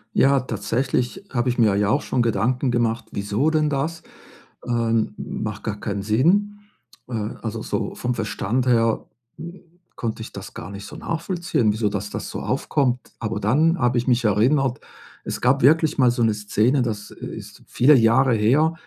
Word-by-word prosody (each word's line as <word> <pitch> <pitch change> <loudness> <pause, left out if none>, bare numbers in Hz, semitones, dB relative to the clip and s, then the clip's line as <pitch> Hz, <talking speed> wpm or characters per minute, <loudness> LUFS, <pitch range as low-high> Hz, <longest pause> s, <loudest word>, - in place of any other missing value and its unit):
Ja, 140 0 +4
tatsächlich 125 - -2
habe 120 0 -1
ich 125 - -1
mir 110 -4 +4
ja 105 0 +2
auch - - +2
schon 125 - -1
Gedanken 120 +4 +1
gemacht: 120 -1 0
„Wieso 105 +9 0
denn 155 -1 +1
das? 155 +4 -2 0.6
Ähm, 115 -2 0
macht 105 -2 -5
gar 105 -1 -4
keinen 100 -2 -3
Sinn.“ 180 - +2 0.5
Äh, 125 - -8 0.3
also, 115 0 -4
so - - -3
vom 125 0 -2
Verstand 115 +3 -1
her, 115 -2 +2 0.3
hm, 170 +3 -9 0.3
konnte 110 -1 -4
ich - - -8
das - - -9
gar 90 +4 -8
nicht 100 0 -8
so - - -10
nachvollziehen, 170 - -1
wieso 105 0 0
dass 105 0 -4
das - - -5
so - - -5
aufkommt. 125 -4 0 0.2
Aber 110 -1 -3
dann 155 - +2
habe 120 0 +2
ich 120 - -1
mich 120 -1 +2
erinnert, 125 +6 +2 0.4
es - - -5
gab 130 +3 +3
wirklich 160 +2 +4
mal 125 -3 +5
so 120 -1 0
'ne 110 -2 +3
Szene, 110 +6 +1
das 105 -3 -3
ist - - -9
viele 140 +4 +5
Jahre 120 +2 +4
her, 140 +10 +3
120 Hz, 175 wpm, -22 LUFS, 110-135 Hz, 0.6 s, mal